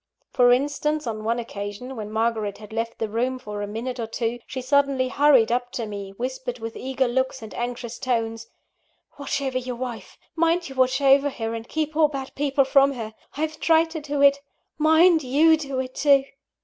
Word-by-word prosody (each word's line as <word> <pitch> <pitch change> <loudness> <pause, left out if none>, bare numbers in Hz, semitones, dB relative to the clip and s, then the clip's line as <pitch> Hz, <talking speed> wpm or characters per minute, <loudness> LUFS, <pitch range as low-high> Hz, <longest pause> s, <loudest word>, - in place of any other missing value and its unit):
For 245 -1 +5
instance, 290 +4 0
on 215 -2 -4
one 230 +2 0
occasion, 225 +2 -6
when 215 -3 -6
Margaret 220 -2 -1
had 210 0 -12
left 230 +1 -3
the 225 - -2
room 245 +4 -1
for 210 -4 -6
a 205 - -3
minute 240 +4 -5
or 230 - -3
two, 230 +1 -2
she 260 - -5
suddenly 270 0 +2
hurried 270 -5 +4
up 245 0 -1
to 235 - -3
me, 200 -2 -6
whispering 255 0 -4
with 225 0 -6
eager 265 0 -1
looks 260 0 -1
and 220 - -9
anxious 240 -1 -5
tones: 230 -3 -2 0.7
"Watch 280 0 -2
over 260 -1 -1
your 250 -1 -5
wife 240 -2 -7 0.2
mind 335 0 +1
you - - -8
watch 260 +1 +2
over 275 +1 +5
her, 225 -4 -4
and 230 0 -7
keep 310 -1 -2
all 310 -1 +5
bad 275 -2 -6
people 275 -1 +1
from 275 +1 +4
her! 225 -4 -6 0.2
I've 310 +1 -2
tried 325 0 +3
to 320 -1 -5
do 290 -1 -1
it 280 0 +6 0.4
mind 320 +2 +5
you 300 +5 +4
do 275 -4 -4
it, 255 0 -4
too!" 280 -2 +4
255 Hz, 200 wpm, -24 LUFS, 230-280 Hz, 0.7 s, it